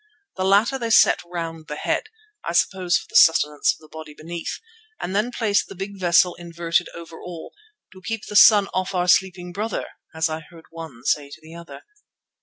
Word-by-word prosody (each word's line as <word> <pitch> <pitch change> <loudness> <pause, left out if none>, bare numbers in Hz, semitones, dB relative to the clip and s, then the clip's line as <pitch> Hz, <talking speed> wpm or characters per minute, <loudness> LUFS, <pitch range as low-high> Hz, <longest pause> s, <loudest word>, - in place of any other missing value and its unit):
The 185 - -2
latter 210 +7 +3
they 230 -2 -3
set 225 - +5
round 165 -2 -6
the 150 - -5
head, 295 - -2 0.4
I - - -4
suppose 185 -2 +2
for - - -8
the - - -15
sustenance 150 -3 +5
of - - -9
the 155 - -16
body 155 -1 -11
beneath, 170 +2 -6 0.4
and 185 - -4
then 215 +4 +1
placed 210 -4 0
the 195 - -11
big 195 +1 -7
vessel 175 0 +4
inverted 170 0 -1
over 165 -1 -10
all, 170 -2 -9 0.4
"to 185 - -15
keep 225 +2 -5
the 210 - -8
sun 205 0 +7
off 185 +1 -2
our 180 0 0
sleeping 180 -1 +1
brother," 215 +4 -3 0.3
as 160 0 0
I 155 0 -4
heard 165 0 -16
one 160 -8 -10
say 145 -1 0
to 145 - -12
the 160 +1 -13
other. 170 0 -11
175 Hz, 200 wpm, -22 LUFS, 165-195 Hz, 0.4 s, sun